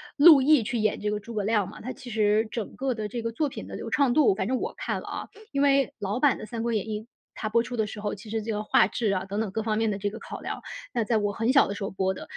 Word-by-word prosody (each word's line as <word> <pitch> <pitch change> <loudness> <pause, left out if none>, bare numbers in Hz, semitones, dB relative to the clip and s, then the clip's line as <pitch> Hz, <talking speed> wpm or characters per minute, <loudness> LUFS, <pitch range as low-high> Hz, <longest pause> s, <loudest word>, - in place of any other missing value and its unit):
陆 295 -1 +9
毅 285 -3 +5
去 230 +2 -2
演 215 -1 +1
这 210 0 -1
个 210 - -1
诸 230 +2 -9
葛 205 - 0
亮 210 -2 +1
嘛， - - -11
他 255 - -5
其 245 - -11
实 215 0 +2
整 225 -3 -5
个 265 -2 -1
的 215 -1 -3
这 235 +2 -4
个 230 0 -2
作 300 +6 0
品 275 - -7
的 - - -7
流 - - -6
畅 280 -4 +3
度 295 -9 +5
反 190 0 -2
正 255 +2 +1
我 - - -3
看 - - -3
了 - - -11
啊， - - -5 0.2
因 280 - 0
为 275 -2 +3
老 205 +4 -2
版 285 -3 +3
的 - - -7
三 230 -1 -4
国 235 -1 0
演 220 +1 -1
义， 215 0 -4 0.3
它 215 - -3
播 230 +2 +3
出 245 +1 -5
的 220 - +2
时 210 0 -7
候， 205 - -2
其 210 +2 -11
实 225 -1 -1
这 225 +1 -3
个 210 0 -2
画 200 - +4
质 215 -1 -1
啊 190 -1 -1
等 200 +2 -3
等 220 -3 -1
各 220 - -2
方 215 -1 -1
面 225 -1 +1
的 200 - -3
这 205 +1 -1
个 220 - -8
考 - - -8
量， - - -5 0.3
那 235 - +1
在 220 +1 +1
我 205 -1 0
很 230 +5 +1
小 280 - +6
的 200 - -4
时 - - -5
候 195 - -3
播 190 0 0
的。 - - -8
220 Hz, 350 characters per minute, -27 LUFS, 210-245 Hz, 0.3 s, 陆